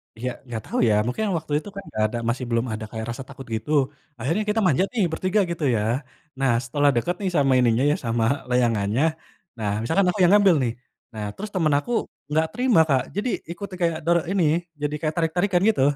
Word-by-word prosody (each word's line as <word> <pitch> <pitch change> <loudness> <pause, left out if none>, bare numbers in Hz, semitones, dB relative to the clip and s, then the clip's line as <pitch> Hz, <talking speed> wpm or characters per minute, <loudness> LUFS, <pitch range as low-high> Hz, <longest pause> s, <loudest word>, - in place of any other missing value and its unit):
Ya 125 +3 -3 0.2
nggak 115 -2 -4
tahu - - -4
ya 110 - +4
mungkin 125 - -2
waktu 160 -2 -5
itu 205 - -10
kan 200 - -6
nggak 110 - -1
ada 120 - -4
masih 125 +2 -2
belum 115 0 +1
ada 110 0 -5
kayak 110 -1 -4
rasa 125 +3 -6
takut 135 -1 -10
gitu 110 +7 -5 0.5
akhirnya 165 - 0
kita 220 +1 +2
manjat 180 +4 +3
nih 225 -5 +1
bertiga 185 +5 +1
gitu 170 -2 -4
ya, 105 - +1 0.6
nah 135 -2 +3
setelah 145 +4 +2
deket 175 +10 0
nih 195 - 0
sama 140 -3 +4
ininya 120 0 +3
ya - - +2
sama 115 0 0 0.3
layangannya, 120 -1 +2 0.5
nah 105 -2 -2
misalkan 165 - +2
aku 200 - -2
yang 175 - +5
ngambil 200 -4 +6
nih, 120 - 0 0.4
nah 105 -1 -4
terus 210 +2 -6
temen 160 -5 +2
aku 240 - -7 0.4
nggak 160 +2 +3
terima 245 -4 +3
Kak 135 -2 +3
jadi 210 +5 -1 0.2
ikuti 190 +3 -7
kayak 165 -2 +1
doro 170 0 +4
ini 195 -3 +2 0.4
jadi 150 0 -1
kayak 155 -1 -1
tarik-tarikan 175 +3 +1
gitu. 215 - +1
150 Hz, 205 wpm, -24 LUFS, 120-185 Hz, 0.6 s, ngambil